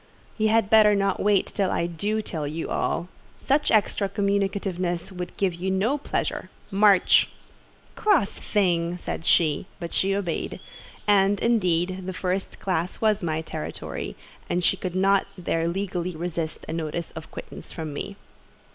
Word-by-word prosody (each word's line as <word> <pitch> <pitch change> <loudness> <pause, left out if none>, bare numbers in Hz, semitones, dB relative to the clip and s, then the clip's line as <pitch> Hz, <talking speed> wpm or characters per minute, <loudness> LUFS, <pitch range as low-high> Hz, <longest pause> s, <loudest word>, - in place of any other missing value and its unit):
"You 215 -1 +2
had 220 -2 +3
better 215 -1 +7
not 195 -1 +1
wait 205 -2 +3
until 195 -3 +1
I 170 - 0
do 205 +6 -1
tell 155 -7 -3
you 160 +3 -4
all. 170 - 0 0.3
Such 290 +2 +1
extra 205 -2 +2
communicativeness 195 -3 -1
could 180 -1 -6
give 195 -3 +1
you 180 +3 -3
no 210 +10 +1
pleasure. - - -2 0.2
March!" 200 -1 +5 0.7
"Cross 370 - +3
thing!" 175 -4 0
said 165 - -5
she; 160 +1 +3
but 170 - -5
she 195 +1 +2
obeyed: 185 -5 -2 0.5
and, 200 -1 +4
indeed, 185 -5 +1
the 190 - -3
first 185 +1 -2
classe 180 -2 -1
was 215 -1 +2
my 160 -2 -1
territory, 155 -1 -5 0.3
and 175 0 0
she 195 - +3
could 185 -2 -5
not 195 +1 +3
there 165 -2 0
legally 180 -1 -2
resist 165 -1 -3
a - - -4
notice 165 +1 -3
of 160 -1 -9
quittance - - -9
from 160 -3 -5
me. 200 +7 -5
185 Hz, 155 wpm, -25 LUFS, 170-200 Hz, 0.7 s, better